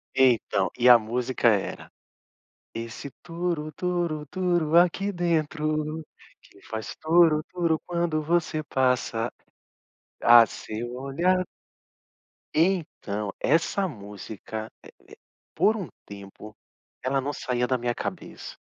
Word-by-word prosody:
Então, 120 -7 +3
e 125 0 +3
a 120 -1 +10
música 120 +3 -1
era: 100 -3 -1 0.8
Esse 115 +4 -6
turu 170 -3 -3
turu 170 -2 -2
turu 175 -3 +1
aqui 180 +3 +3
dentro, 155 -3 -1 0.4
que - - -21
faz 110 0 -5
turu 160 -1 +4
turu 170 -3 0
quando 170 -3 0
você 160 0 0
passa. 125 -4 0 0.9
Ah, 120 0 +9
o - - -7
seu 115 +4 -6
olhar 170 +8 +1 1.1
Então, 150 - 0
essa 165 +6 +2
música 110 - -8
eh - - -12
eh - - -17 0.6
por 220 - +3
um 190 - -5 0.2
tempo, 100 +1 -11 0.5
ela 135 +1 +1
não 140 +2 -3
saía 125 -3 -1
da 130 0 0
minha 120 0 -1
cabeça. - - -6
150 Hz, 115 wpm, -26 LUFS, 120-170 Hz, 1.1 s, a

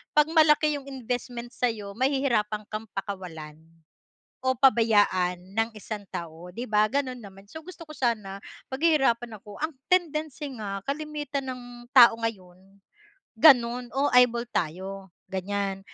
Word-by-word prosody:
'pag 300 0 +5
malaki 305 -2 +4
yung 275 - -15
investment 245 -2 -5
sa'yo 225 -6 -2
mahihirapan 245 -6 +1
kang 215 +1 -5
pakawalan, 175 -6 -6 0.9
o 260 - +3
pabayaan 205 -8 +3 0.2
ng 225 +1 +1
isang 215 0 -6
tao, 170 +1 -7
'di 235 +7 -6
ba 210 0 +4
ganun 265 -2 -1
naman. 195 -3 -13
So 320 - -9
gusto 365 -2 -10
ko 305 - -10
sana 215 -7 -1 0.3
paghihirapan 265 -7 +1
ako, 205 -1 -11
ang 315 +2 -1 0.2
tendency 310 -5 0
nga 200 -3 -4
kalimitan 290 -1 -4
ng 250 -1 -9 0.3
tao 240 -3 +9
ngayon, 195 -3 -6 0.6
ganun. 245 -2 +5
"oh, 275 +2 +2
eyeball 245 -1 +5
tayo" 190 +4 -4 0.2
ganyan, 195 +1 -2
235 Hz, 130 wpm, -26 LUFS, 200-275 Hz, 0.9 s, tao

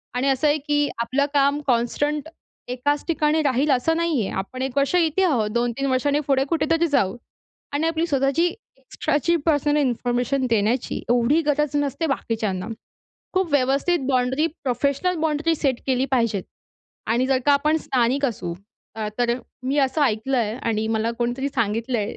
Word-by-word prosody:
आणि 255 +2 0
असं 270 +3 +2
आहे 295 +1 +3
की 290 0 +2
आपलं 260 +5 +1
काम 280 +1 +2
कॉन्स्टंट 285 +5 0 0.4
एकाच 270 +4 -1
ठिकाणी 310 -1 +2
राहील 280 +1 +2
असं 275 +6 +2
नाहीये. 320 - 0
आपण 200 +7 -5
1 265 0 -3
वर्ष 280 +4 +2
इथे 340 +1 +2
आहोत 245 - +2
2-3 240 +3 -1
वर्षांनी 285 +3 +1
पुढे 270 -1 +3
कुठेतरी 330 +1 +1
जाऊ. 220 - +1 0.6
आणि 295 +3 0
आपली 330 0 0
स्वतःची 275 +2 +2 0.3
एक्स्ट्राची 285 +4 -1
पर्सनल 295 -2 +2
इन्फॉर्मेशन 250 0 0
देण्याची 225 +2 0
एवढी 245 +6 +3
गरज 295 -1 +1
नसते 290 +3 -1
बाकीच्यांना. 220 -8 -2 0.7
खूप 375 -2 0
व्यवस्थित 280 +5 +2
बाउंड्री 260 +3 +1 0.2
प्रोफेशनल 280 +7 0
बाउंड्री 320 +1 +1
सेट 270 -5 -1
केली 260 -1 +1
पाहिजे 230 -6 +1 0.7
आणि 245 +3 +1
जर 265 -1 +2
का 290 - +6
आपण 300 +3 +3
स्थानिक 260 -2 0
असू 185 -8 -4 0.4
अ, 215 -1 -2
तर 240 -1 +2 0.3
मी 265 +3 -1
असं 280 +2 +2
ऐकलं 255 +1 +1
आहे 220 -2 -1
आणि 220 -1 0
मला 225 0 0
कोणीतरी 245 +3 -1
सांगितलंय, 230 -2 -1
270 Hz, 155 wpm, -23 LUFS, 240-295 Hz, 0.7 s, का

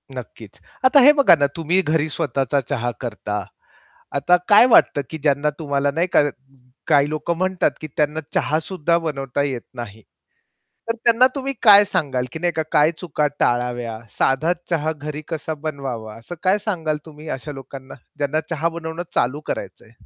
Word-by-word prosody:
नक्कीच. - - -10 0.3
आता 270 +2 +7
हे 280 +3 +8
बघा 280 - +6
ना, 140 - +3
तुम्ही 170 +3 +1
घरी 155 -2 0
स्वतःचा 140 -1 -1
चहा 120 -4 -1
करता. 105 -4 -4 0.7
आता 145 +6 +4
काय 210 +3 +8
वाटतं 145 - +5
की 160 - -5
ज्यांना 145 0 +1
तुम्हाला 140 -2 0
नाही 170 +3 +1
का - - +6 0.6
काही 145 0 +4
लोक 155 +2 -4
म्हणतात, 185 +2 +1
की 155 - -5
त्यांना 150 +1 0
चहा 155 +1 +1
सुद्धा 170 -1 0
बनवता 140 -4 -2
येत 130 -4 -3
नाही. 110 -3 -8 0.9
तर 230 - +1
त्यांना 235 +2 +6
तुम्ही 275 0 -3
काय 205 -2 +8
सांगाल 135 -9 -1
की - - -5
नाही 175 +1 0
का 160 - -1
काय 150 +2 +5
चुका 155 -4 -1
टाळाव्या, 120 -2 0 0.2
साधा 155 +6 +2 0.2
चहा 160 -1 0
घरी 150 0 -7
कसा 160 -1 -4
बनवावा? 135 -8 -6
असं 115 +10 -9
काय 190 +2 +3
सांगाल 160 -7 -1
तुम्ही 155 0 -11
अशा 150 +3 -8
लोकांना, 135 0 -10 0.2
ज्यांना 145 +2 0
चहा 165 0 0
बनवणं 165 0 -5
चालू 130 +5 0
करायचंय? 115 - -6
150 Hz, 165 wpm, -21 LUFS, 135-170 Hz, 0.9 s, हे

